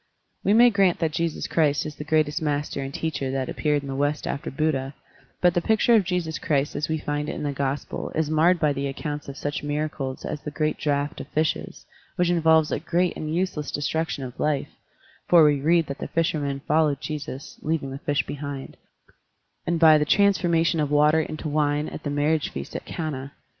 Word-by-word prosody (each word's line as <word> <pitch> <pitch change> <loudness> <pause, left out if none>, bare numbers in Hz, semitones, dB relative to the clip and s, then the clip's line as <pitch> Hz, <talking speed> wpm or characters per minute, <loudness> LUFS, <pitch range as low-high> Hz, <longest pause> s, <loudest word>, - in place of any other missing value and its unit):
We 200 - +3
may 240 +2 +7
grant 195 -4 +3
that 160 -2 0
Jesus 165 0 -2
Christ 150 -3 +1
is 150 - -6
the - - -5
greatest 155 +1 +1
master 145 -2 -1
and 135 0 -4
teacher 155 -4 -3
that 130 -1 -2
appeared 150 -2 0
in - - -7
the 135 - -4
West 145 +2 0
after 150 +4 -3
Buddha, 135 -2 -1 0.5
but 180 -1 +5
the 175 - +1
picture 220 +4 +3
of 220 -3 +5
Jesus 170 -3 -2
Christ 145 -2 0
as 150 - -2
we 160 - 0
find 145 0 -3
it - - -4
in - - -5
the 145 - -1
Gospel 140 +1 -3
is 160 -1 +1
marred 165 +4 +3
by 150 -2 +2
the 140 0 -2
accounts 145 +1 -5
of 140 - -8
such 145 0 -3
miracles 145 -2 -3
as 150 - -4
the - - -5
great 155 +1 -1
draft 145 -1 -1
of - - -9
fishes, 155 0 -2 0.3
which 175 -1 +2
involves 160 -2 +4
a - - 0
great 175 +3 0
and 155 +1 -3
useless 175 -5 -1
destruction 150 0 -2
of 125 -1 -8
life 150 -2 0 0.6
(for 170 -2 +7
we 145 -2 +3
read 165 +2 +3
that 140 - -6
the - - -4
fishermen 145 -4 -1
followed 150 -2 +2
Jesus, 150 -2 -6
leaving 155 -4 -2
the 135 - -6
fish 145 -1 0
behind), 140 -1 -6 0.9
and 170 -1 +1
by 160 -2 +7
the - - +2
transformation 170 -2 +3
of 150 -2 0
water 150 +2 +4
into 155 +1 -5
wine 150 0 +1
at - - -7
the 145 - -4
marriage 145 +1 +1
feast 70 +1 -7
at - - -5
Cana. 140 -4 -5
150 Hz, 205 wpm, -25 LUFS, 145-160 Hz, 0.9 s, may